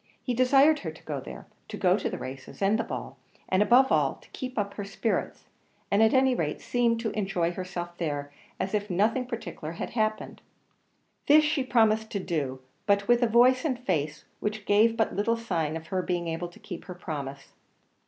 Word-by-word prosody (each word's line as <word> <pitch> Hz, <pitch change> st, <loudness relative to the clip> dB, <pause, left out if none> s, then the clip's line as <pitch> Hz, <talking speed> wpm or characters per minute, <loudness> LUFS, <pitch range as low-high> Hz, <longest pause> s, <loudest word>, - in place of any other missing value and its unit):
He 250 Hz, -, -1 dB
desired 275 Hz, +5 st, +5 dB
her 165 Hz, -, -5 dB
to 160 Hz, -, -12 dB
go 145 Hz, -3 st, -4 dB
there -, -, -9 dB, 0.2 s
to -, -, -6 dB
go -, -, +3 dB
to -, -, -2 dB
the -, -, -4 dB
races 130 Hz, +1 st, -8 dB
and 200 Hz, +3 st, +2 dB
the -, -, +1 dB
ball -, -, -6 dB, 0.3 s
and, 190 Hz, +1 st, +2 dB
above 245 Hz, +6 st, +5 dB
all, -, -, +2 dB
to -, -, -21 dB
keep 255 Hz, -2 st, -6 dB
up 200 Hz, -1 st, -1 dB
her 205 Hz, -, -5 dB
spirits, 200 Hz, +3 st, -2 dB, 0.5 s
and 200 Hz, +2 st, +4 dB
at 220 Hz, 0 st, +5 dB
any 260 Hz, 0 st, +4 dB
rate 155 Hz, -10 st, -2 dB
seem 240 Hz, -1 st, +1 dB
to 225 Hz, -1 st, -2 dB
enjoy 190 Hz, -5 st, -1 dB
herself 175 Hz, -1 st, -5 dB
there 145 Hz, -4 st, -3 dB, 0.3 s
as 190 Hz, -, -2 dB
if 210 Hz, 0 st, -1 dB
nothing 220 Hz, +7 st, +1 dB
particular 195 Hz, -9 st, -6 dB
had -, -, -5 dB
happened. 215 Hz, -2 st, -2 dB, 0.9 s
This 305 Hz, +2 st, +7 dB
she 300 Hz, -2 st, +1 dB
promised 220 Hz, -3 st, +2 dB
to 200 Hz, -, 0 dB
do, 145 Hz, -8 st, -3 dB, 0.3 s
but 200 Hz, 0 st, +2 dB
with 240 Hz, 0 st, +4 dB
a 240 Hz, -, +4 dB
voice 245 Hz, +4 st, +5 dB
and 275 Hz, -6 st, 0 dB
face 155 Hz, -, -2 dB
which 210 Hz, 0 st, -3 dB
gave 220 Hz, +3 st, +4 dB
but 220 Hz, -, +1 dB
little 230 Hz, +4 st, +1 dB
sign 165 Hz, -9 st, -2 dB
of 160 Hz, -, -10 dB
her 185 Hz, -1 st, 0 dB
being 175 Hz, -1 st, -2 dB
able 165 Hz, +2 st, -3 dB
to 175 Hz, -, -16 dB
keep 175 Hz, -, -8 dB
her 180 Hz, -, -8 dB
promise. 140 Hz, -5 st, -6 dB
205 Hz, 200 wpm, -27 LUFS, 170-235 Hz, 0.9 s, This